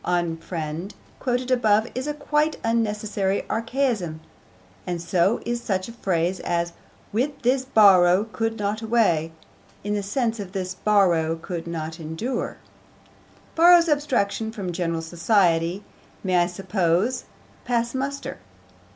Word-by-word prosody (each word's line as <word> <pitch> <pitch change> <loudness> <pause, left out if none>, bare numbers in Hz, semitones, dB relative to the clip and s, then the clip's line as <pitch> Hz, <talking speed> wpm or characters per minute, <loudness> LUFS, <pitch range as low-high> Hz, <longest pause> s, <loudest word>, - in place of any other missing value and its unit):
Unfriend, 170 0 -3 0.3
quoted 250 0 -1
above, 220 -3 +3
is 260 +3 -3
a 295 - -1
quite 300 +1 0
unnecessary 210 -3 0
archaism, 230 - -1 0.7
and 175 -1 -2
so 175 +5 +1
is 240 0 -2
such 190 -5 -1
a - - -8
phrase 185 -5 -1
as 170 0 -1 0.4
With 270 +6 -1
this 255 +2 +2
Borrow 195 -6 +6
could 225 0 -3
not 210 +1 -2
away, 215 -9 +2 0.5
in 205 +1 -2
the 205 - 0
sense 225 +3 -1
of 195 -2 -7
'this 185 -2 -3
Borrow 180 -6 +2
could 170 0 -6
not 160 -1 -5
endure.' 165 +11 -4 1.0
'Borrow's 340 0 +6
abstraction 240 -7 0
from 200 -5 -4
general 170 -2 -2
society' 175 +1 +1 0.4
may, 185 -2 +2
I 175 0 +4
suppose, 190 +5 0 0.4
pass 235 -1 0
muster. 275 +1 -4
205 Hz, 125 wpm, -24 LUFS, 175-235 Hz, 1.0 s, Borrow